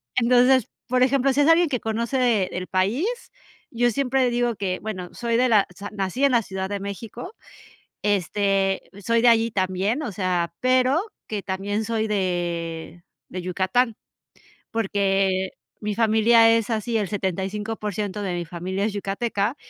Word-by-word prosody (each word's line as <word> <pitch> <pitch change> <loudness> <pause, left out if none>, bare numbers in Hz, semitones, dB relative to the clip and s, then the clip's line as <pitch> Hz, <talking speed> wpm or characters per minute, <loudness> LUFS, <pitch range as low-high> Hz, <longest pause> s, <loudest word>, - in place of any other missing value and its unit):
Entonces, 250 0 +4 0.2
por 250 0 +3
ejemplo, 270 +1 +3
si 275 +2 +2
es 290 - +4
alguien 330 0 +5
que 255 -4 -1
conoce 230 -1 +1
el 180 +1 -4
país, 195 - 0 0.6
yo 240 0 +1
siempre 260 0 +1
digo 240 -1 0
que 185 -2 -2
bueno, 185 -5 -5
soy 235 -1 -1
de 255 +1 +3
la 215 -5 +4
o - - -18
sea, 205 0 -6
nací 200 +6 -2
en 280 - +5
la 240 -2 +4
Ciudad 190 -2 -5
de 205 0 -3
México. 215 - -7 0.7
Este, 195 -1 0
soy 230 0 +2
de 245 - +6
allí 230 0 +4
también, 195 +6 -1
o 235 - -4
sea, 180 -3 -1
pero, 255 +4 +3 0.3
que 210 -2 -4
también 200 +3 -2
soy 220 -1 -1
de 175 -4 -3 0.3
de 185 - -6
Yucatán, 190 +6 0 0.8
porque, 195 -3 +1 0.3
mi 210 -1 -2
familia 225 +1 +5
es 230 0 -1
así, 225 +1 -1
el 210 -3 0
75% 205 +1 -3
de 185 -3 -2
mi 175 0 -3
familia 180 +4 -3
es 215 - -1
yucateca, 205 +3 -2
210 Hz, 160 wpm, -23 LUFS, 190-240 Hz, 0.8 s, de